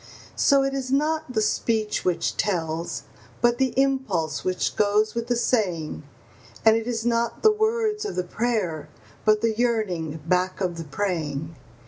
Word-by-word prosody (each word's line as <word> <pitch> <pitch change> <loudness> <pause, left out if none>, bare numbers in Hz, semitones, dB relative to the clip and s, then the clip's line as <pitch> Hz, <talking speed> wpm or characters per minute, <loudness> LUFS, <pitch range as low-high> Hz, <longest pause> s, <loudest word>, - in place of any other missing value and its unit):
So 275 -1 +4
it 275 0 -1
is 265 -1 -3
not 310 +1 +1
the 220 -2 +2
speech 215 0 0
which 180 -2 0
tells, 165 -4 -2 0.4
but 240 +1 +2
the 265 0 +1
impulse 225 - 0
which 185 0 -1
goes 210 +1 +2
with 235 0 -3
the 245 - +1
saying; 185 -12 0 0.6
And 220 0 +7
it 225 0 -2
is 230 -2 -2
not 235 -1 0
the 435 - +7
words 435 0 0
of 420 - -4
the 180 - 0
prayer, 180 -8 -2 0.4
but 215 0 +4
the 230 -1 +2
yearning 200 -10 -1
back 180 +2 +1
of 180 -3 -1
the 165 - -5
praying. 155 -2 -3
220 Hz, 160 wpm, -25 LUFS, 180-250 Hz, 0.6 s, And